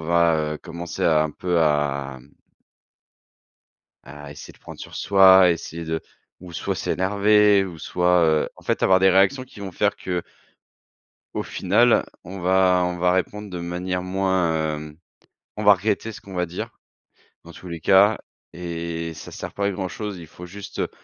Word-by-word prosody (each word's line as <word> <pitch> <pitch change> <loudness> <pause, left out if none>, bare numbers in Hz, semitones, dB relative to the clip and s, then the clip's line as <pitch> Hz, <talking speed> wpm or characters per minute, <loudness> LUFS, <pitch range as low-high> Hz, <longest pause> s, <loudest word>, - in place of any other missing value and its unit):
va, 80 -2 +2
heu, - - -8
commencer 85 0 -7
un 80 -1 +3
peu 90 +2 -1
à 70 -3 0
mmh 65 - -20 1.8
à 75 +1 -11
essayer 75 - -11
de - - -23
prendre - - -12
sur - - -10
soi, 95 -2 +6
essayer 85 0 -4
de 80 0 -3 0.4
ou 90 -1 -11
soit 85 - -3
s'énerver 105 +1 +3
ou 90 -4 -8
soit, 90 +2 +1
heu, 80 -1 +1
en - - -15
fait - - -1
avoir 95 0 +5
des 95 0 +5
réactions 100 +8 +3
qui 115 -5 -14
vont 95 -1 -6
faire 105 +3 0
que 90 -2 -4 1.1
au - - -1
final - - +2 0.2
on 95 +2 -8
va 90 0 +3
on 90 0 -3
va 90 +1 +3
répondre 100 +3 -2
de 90 -2 -6
manière 90 +1 -3
moins, 90 -5 0
hem 75 0 -9 0.6
on 105 - -3
va 105 - +9
regretter 105 +3 -2
ce - - -11
qu'on 100 - -12
va 90 -1 -1
dire, 85 +1 -6 0.8
dans - - -11
tous 95 - -12
les 85 -1 -6
cas 100 +5 +5 0.4
et 85 -1 -5
ça 75 - -11
sert - - -7
pas 100 - -2
à - - 0
grand 95 -1 -4
chose. 105 0 -6
Il 85 - -11
faut 90 +2 -11
juste, 100 +3 -9
heu, - - -1
90 Hz, 180 wpm, -23 LUFS, 80-95 Hz, 1.8 s, va